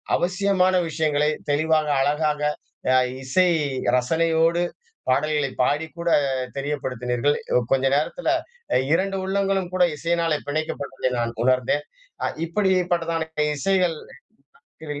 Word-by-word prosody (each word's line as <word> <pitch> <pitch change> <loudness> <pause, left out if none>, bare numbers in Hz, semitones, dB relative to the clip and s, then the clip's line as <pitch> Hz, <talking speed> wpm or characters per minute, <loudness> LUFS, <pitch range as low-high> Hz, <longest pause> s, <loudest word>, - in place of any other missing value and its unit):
அவசியமான 185 0 +2
விஷயங்களை 150 -2 +1 0.2
தெளிவாக 155 +1 +2
அழகாக, 150 +1 +1 0.5
அ - - +5 0.3
இசை 135 +8 +3 0.5
ரசனையோடு 165 +5 +2 0.5
பாடல்களை 145 +1 +1
பாடி 145 +5 0
கூட 170 0 -1 0.5
தெரியப்படுத்தினீர்கள். 130 -1 -1 0.3
கொஞ்ச 135 0 +3
நேரத்தில 155 - -1 0.6
2 195 +3 +1
உள்ளங்களும் 195 -1 0
கூட 180 -1 +5
இசையினால் 165 0 0
பிணைக்கப்பட்டதை 140 -4 -2
நான் 115 0 -1
உணர்ந்தேன். 130 +3 +2 0.4
அ - - +2 0.2
இப்படி 190 +3 +1 0.2
பட்டதான 165 -1 -1 0.3
இசைகள். 185 0 +1 0.9
கத 150 -2 -5
155 Hz, 100 wpm, -23 LUFS, 145-175 Hz, 0.9 s, அ